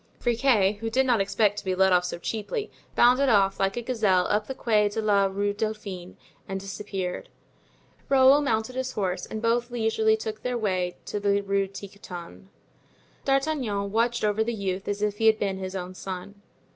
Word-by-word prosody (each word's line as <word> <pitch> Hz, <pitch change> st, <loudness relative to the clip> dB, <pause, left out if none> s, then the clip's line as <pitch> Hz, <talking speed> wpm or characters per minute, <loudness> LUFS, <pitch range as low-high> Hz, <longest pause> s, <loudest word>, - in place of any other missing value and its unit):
Friquet, 230 Hz, -5 st, +2 dB
who 225 Hz, +1 st, -3 dB
did 260 Hz, +4 st, +2 dB
not 240 Hz, -5 st, +3 dB
expect 205 Hz, +1 st, +1 dB
to -, -, -11 dB
be 185 Hz, -2 st, -1 dB
let 190 Hz, 0 st, +4 dB
off 180 Hz, 0 st, +3 dB
so 180 Hz, -, -4 dB
cheaply, 230 Hz, -, -4 dB, 0.2 s
bounded 255 Hz, +3 st, +5 dB
off 195 Hz, -3 st, +3 dB
like 195 Hz, +3 st, 0 dB
a 240 Hz, -, -2 dB
gazelle 210 Hz, -7 st, +2 dB
up 210 Hz, 0 st, +1 dB
the 265 Hz, -, -5 dB
Quai 210 Hz, -4 st, +2 dB
a -, -, -1 dB
la 205 Hz, -2 st, +3 dB
Rue 200 Hz, +1 st, -1 dB
Dauphine, 205 Hz, -4 st, -5 dB, 0.3 s
and 195 Hz, 0 st, -3 dB
disappeared. 195 Hz, -, -5 dB, 0.8 s
Raoul 270 Hz, +1 st, +6 dB
mounted 220 Hz, -4 st, -1 dB
his 260 Hz, 0 st, -3 dB
horse, 185 Hz, -3 st, -2 dB
and 220 Hz, +1 st, -6 dB
both 235 Hz, +1 st, +1 dB
leisurely 220 Hz, -2 st, +1 dB
took 220 Hz, 0 st, -5 dB
their 250 Hz, -1 st, -2 dB
way 185 Hz, -5 st, -1 dB
to 210 Hz, -, -3 dB
the 200 Hz, 0 st, +2 dB
Rue 195 Hz, 0 st, 0 dB
Tiquetonne. 195 Hz, -2 st, -10 dB, 0.8 s
D'Artagnan 270 Hz, -8 st, 0 dB
watched 235 Hz, +2 st, +1 dB
over 210 Hz, +1 st, +2 dB
the 235 Hz, +1 st, -2 dB
youth 195 Hz, -2 st, -3 dB
as 205 Hz, 0 st, -2 dB
if 210 Hz, -1 st, -1 dB
he 225 Hz, -, +3 dB
had 220 Hz, -1 st, +5 dB
been 195 Hz, -3 st, -2 dB
his 190 Hz, 0 st, -5 dB
own 185 Hz, -1 st, -5 dB
son. 190 Hz, +2 st, -7 dB
210 Hz, 185 wpm, -26 LUFS, 195-230 Hz, 0.8 s, Raoul